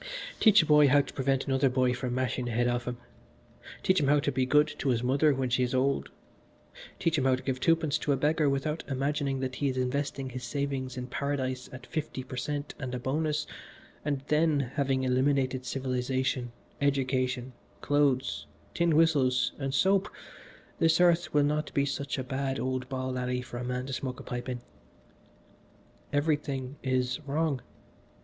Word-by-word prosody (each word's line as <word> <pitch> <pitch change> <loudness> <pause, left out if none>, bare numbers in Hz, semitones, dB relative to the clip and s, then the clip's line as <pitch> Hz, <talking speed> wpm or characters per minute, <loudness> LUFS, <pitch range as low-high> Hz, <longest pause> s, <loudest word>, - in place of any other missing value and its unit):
Teach 210 -5 +6
a - - -2
boy 150 -1 +6
how 140 +2 +5
to - - -9
prevent 135 0 0
another 135 0 +2
boy 125 -1 +2
from 125 -1 -3
mashing 130 -1 -1
the 120 - -3
head 120 +2 +2
off 120 0 -1
him, 125 -1 -3 0.9
teach 185 0 +3
him 140 - +1
how 145 +1 +5
to 145 - 0
be 130 -1 0
good 150 +3 +5
to 140 - 0
his 120 -2 +1
mother 140 +4 +3
when 135 -1 0
she 125 - +2
is 125 +1 0
old, 135 +2 +1 0.9
teach 165 -2 +1
him 130 - 0
how 130 -1 +4
to 130 - -8
give 130 -1 -2
two 165 +5 +4
pence 160 -3 -1
to 145 - -1
a 140 - +2
beggar 150 +1 +2
without 150 +3 -1
imagining 140 0 -1
that 130 -1 -3
he 145 - 0
is 130 - -3
investing 135 +1 -2
his 125 0 -6
savings 135 0 -3
in 125 - -3
Paradise 130 -1 -3
at 130 0 -10
fifty 150 -4 -4
per 130 - -8
cent 145 +3 -3
and 130 -3 -4
a - - -3
bonus; 150 +3 -1 0.6
and 145 -2 -1
then, 150 -4 +2
having 135 -2 0
eliminated 130 0 +1
civilisation, 130 -1 -1 0.3
education, 130 -2 0 0.3
clothes, 145 -3 +1 0.3
tin 170 -2 +2
whistles 135 -6 +3
and 135 -1 -2
soap 195 +7 +3 0.7
this 165 0 +4
earth 175 -2 +4
will 145 -1 +4
not 150 +1 0
be 140 - +3
such 140 0 -3
a 130 - -2
bad 135 +1 -2
old 130 0 -2
ball 130 -1 -2
alley 125 0 -2
for 120 - -8
a 125 - -4
man 125 +1 -2
to 135 - -5
smoke 130 -1 -4
a - - -8
pipe 125 +1 -5
in. 125 -1 -4 1.5
"Everything 145 -2 -1
is 130 0 0
wrong. 145 -2 0
135 Hz, 185 wpm, -29 LUFS, 130-145 Hz, 1.5 s, Teach